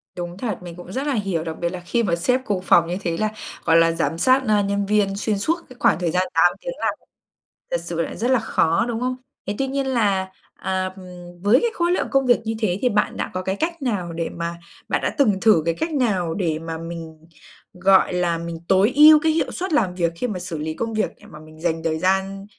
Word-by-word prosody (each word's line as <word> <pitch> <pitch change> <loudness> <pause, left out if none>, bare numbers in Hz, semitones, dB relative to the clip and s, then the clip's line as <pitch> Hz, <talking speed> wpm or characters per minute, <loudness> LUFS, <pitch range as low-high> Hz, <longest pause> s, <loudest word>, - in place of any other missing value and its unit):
Đúng 175 0 -6
thật, 235 -1 -3
mình 175 -1 -8
cũng 175 +1 -10
rất 265 +7 -3
là 290 - +1
hiểu, 195 -8 -1
đặc 160 -1 -5
biệt 170 - 0
là 180 +1 -6
khi 235 +6 0
mà 175 -6 +1
sếp 250 +10 +1
cùng 195 -3 -1
phòng 170 -2 +4
như 175 - -2
thế 170 -3 -2
là, 215 +2 0 0.3
gọi 165 -1 +5
là, 165 0 +5
giám 165 -1 -1
sát, 260 +8 +4
ơ, 210 -1 +3
nhân 200 0 -1
viên 200 -1 +1
xuyên 205 0 -1
suốt 320 +11 +1
cái 255 - -12
khoảng - - +3
thời 175 -2 0
gian 180 +2 +2
8 170 +1 +4
tiếng - - -4
làm - - 0 0.8
thật - - 0
sự - - -3
là - - -4
rất 245 +3 0
là 255 - +4
khó, 170 -2 +1
đúng 230 -2 -2
không? 255 0 -1 0.3
Thế 200 - -2
tuy 270 - 0
nhiên 275 0 -2
là, 200 -7 +1 0.2
à, 185 0 -2 0.5
với 205 +5 +5
cái 470 0 +1
khối 345 -2 0
lượng 360 - 0
công 270 -1 +3
việc 245 - +5
như 225 +1 -2
thế 200 -4 0
thì 250 - +3
bạn 210 -2 0
đã - - -3
có 185 - -2
cái 190 +1 -1
cách 330 +6 -3
nào 195 -9 -2
để 165 0 -3
mà 170 0 -4 0.3
bạn - - +1
đã - - -1
từng 215 -10 +3
thử 215 -8 +5
cái 165 - +1
cách 320 - -3
nào 195 - 0
để 165 -6 -1
mà 165 0 -5
mình, 165 -1 -8 0.5
gọi 190 +1 +4
là, 175 -2 +1
mình 170 0 -5
tối 195 +4 +4
ưu 305 +1 +9
cái 320 - +3
hiệu 320 - 0
suất 370 -1 -3
làm 190 -11 +2
việc, 170 -2 +1
khi 250 - -2
mà 200 -6 -4
xử 175 -2 -5
lý 155 +1 -3
công 225 +6 -4
việc 215 - 0
để - - -16
mà 150 - -12
mình 155 0 -15
dành 165 -1 -1
thời 160 -1 -1
gian, 190 +2 0
190 Hz, 255 wpm, -22 LUFS, 170-235 Hz, 0.8 s, ưu